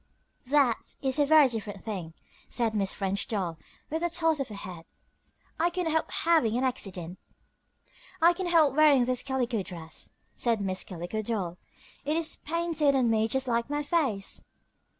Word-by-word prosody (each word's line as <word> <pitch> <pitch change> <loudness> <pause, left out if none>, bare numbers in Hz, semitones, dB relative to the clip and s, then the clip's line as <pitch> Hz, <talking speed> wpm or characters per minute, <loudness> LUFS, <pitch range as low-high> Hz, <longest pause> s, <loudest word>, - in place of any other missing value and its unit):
"That 275 -4 +2
is 265 +2 +2
a 290 - +4
very 310 -2 +7
different 210 -5 -5
thing," 180 -7 -5 0.3
said 230 -3 0
Miss 200 -2 0
French 195 0 -1
Doll, 180 -7 -2 0.3
with 320 +1 -1
a 345 - +1
toss 325 -2 +1
of 275 - -2
her 215 - -8
head. 180 -4 -8 0.7
"I 340 +2 +3
could 360 +1 -2
not 325 - 0
help 320 - +1
having 310 -10 +2
an 255 - 0
accident." 190 -9 -2 1.0
"I 340 +2 +6
cannot 355 -1 -2
help 310 -5 +5
wearing 295 -5 +6
this 250 0 +1
calico 250 -5 -1
dress," 170 -3 -7 0.3
said 230 -3 +1
Miss 190 -2 -1
Calico 180 +4 -5
Doll. 195 -6 -3 0.4
"It 300 +3 0
is 330 -1 0
painted 320 -3 0
on 245 -3 +3
me 220 0 +2
just 265 +3 -1
like 235 +1 0
my 295 0 -1
face." 280 - 0
245 Hz, 170 wpm, -28 LUFS, 200-305 Hz, 1.0 s, very